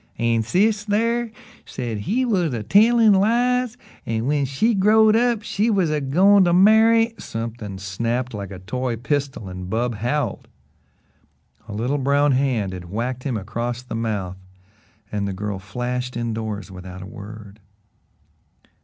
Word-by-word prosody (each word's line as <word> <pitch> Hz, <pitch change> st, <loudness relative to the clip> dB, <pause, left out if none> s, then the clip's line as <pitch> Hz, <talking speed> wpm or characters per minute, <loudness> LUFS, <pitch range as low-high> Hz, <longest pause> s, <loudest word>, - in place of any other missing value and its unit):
"An' 115 Hz, -1 st, +1 dB
sis, 205 Hz, -, +1 dB
thar, 230 Hz, +3 st, 0 dB, 0.3 s
said 115 Hz, -4 st, -5 dB
he 235 Hz, -, 0 dB
was 180 Hz, -, 0 dB
a 110 Hz, -, -4 dB
tellin' 220 Hz, -, +5 dB
lies 245 Hz, +4 st, +2 dB, 0.3 s
an' 115 Hz, 0 st, -2 dB
when 145 Hz, 0 st, +1 dB
she 140 Hz, -, +1 dB
growed 215 Hz, +2 st, +5 dB
up 235 Hz, -2 st, +2 dB
she -, -, -9 dB
said 215 Hz, -, -6 dB
she -, -, +2 dB
was 190 Hz, -7 st, +2 dB
a 150 Hz, -1 st, 0 dB
goin' 190 Hz, +9 st, +5 dB
to 175 Hz, -, +2 dB
marry 220 Hz, +4 st, +5 dB
" -, -, -34 dB
Something 115 Hz, -3 st, -6 dB
snapped 115 Hz, +6 st, -3 dB
like 100 Hz, -2 st, -5 dB
a 95 Hz, -, -8 dB
toy 120 Hz, +6 st, -3 dB
pistol 135 Hz, -2 st, -2 dB
and 90 Hz, 0 st, -7 dB
Bub 120 Hz, +3 st, -1 dB
howled. 120 Hz, +8 st, -2 dB, 1.2 s
A 110 Hz, -, -7 dB
little 125 Hz, +7 st, -1 dB
brown 140 Hz, +2 st, +2 dB
hand 125 Hz, -8 st, 0 dB
had 90 Hz, -2 st, -8 dB
whacked 120 Hz, +6 st, -3 dB
him 130 Hz, -5 st, -1 dB
across 120 Hz, +4 st, -4 dB
the 125 Hz, -, -8 dB
mouth, 105 Hz, -5 st, -3 dB, 0.7 s
and 100 Hz, -1 st, -2 dB
the 100 Hz, -, -3 dB
girl 100 Hz, 0 st, -4 dB
flashed 125 Hz, +6 st, -4 dB
indoors 110 Hz, -3 st, -4 dB
without 90 Hz, 0 st, -9 dB
a -, -, -8 dB
word. 105 Hz, +1 st, -11 dB
125 Hz, 160 wpm, -22 LUFS, -, 1.2 s, tellin